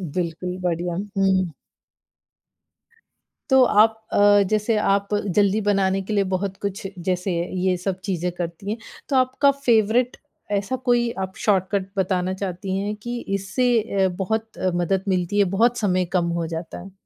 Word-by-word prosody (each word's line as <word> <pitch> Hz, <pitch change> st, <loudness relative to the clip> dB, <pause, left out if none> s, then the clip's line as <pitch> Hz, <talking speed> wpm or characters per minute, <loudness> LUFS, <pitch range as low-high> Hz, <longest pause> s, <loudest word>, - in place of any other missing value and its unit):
बिल्कुल 180 Hz, +1 st, -3 dB
बढ़िया, 175 Hz, -1 st, -1 dB, 0.2 s
हुँ। 190 Hz, -3 st, +2 dB, 2.0 s
तो 265 Hz, -1 st, +6 dB
आप 220 Hz, -1 st, +4 dB
अ, -, -, +2 dB, 0.3 s
जैसे 215 Hz, +1 st, +1 dB
आप 200 Hz, -1 st, +1 dB, 0.3 s
जल्दी 205 Hz, +1 st, +3 dB
बनाने 195 Hz, -1 st, +1 dB
के 205 Hz, +3 st, -4 dB
लिए 200 Hz, -1 st, +3 dB
बहुत 195 Hz, +1 st, -3 dB
कुछ 200 Hz, 0 st, -3 dB, 0.2 s
जैसे 180 Hz, +1 st, -1 dB, 0.3 s
ये 185 Hz, -1 st, +2 dB
सब 185 Hz, +1 st, -3 dB
चीज़ें 180 Hz, -2 st, -2 dB
करती 175 Hz, +2 st, -5 dB
हैं, 225 Hz, -, -2 dB, 0.3 s
तो 275 Hz, -, 0 dB
आपका 260 Hz, +2 st, +3 dB
फेवरेट 245 Hz, -2 st, +2 dB, 0.3 s
ऐसा 200 Hz, +5 st, 0 dB
कोई 240 Hz, -1 st, +3 dB
आप 190 Hz, 0 st, -3 dB
शॉर्टकट 195 Hz, -1 st, +1 dB
बताना 185 Hz, -1 st, 0 dB
चाहती 190 Hz, 0 st, -3 dB
हैं 205 Hz, +2 st, -2 dB
कि 240 Hz, +3 st, -5 dB, 0.2 s
इससे 205 Hz, +6 st, 0 dB, 0.4 s
अ, -, -, +4 dB
बहुत 220 Hz, +3 st, -2 dB
अ, 185 Hz, -, 0 dB
मदद 180 Hz, +2 st, 0 dB
मिलती 185 Hz, +1 st, 0 dB
है 200 Hz, -, +5 dB
बहुत 240 Hz, +3 st, +3 dB
समय 185 Hz, -3 st, +1 dB
कम 170 Hz, -1 st, +1 dB
हो 165 Hz, -, -2 dB
जाता 165 Hz, +1 st, -6 dB
है। 195 Hz, -, -11 dB
195 Hz, 155 wpm, -23 LUFS, 185-215 Hz, 2.0 s, तो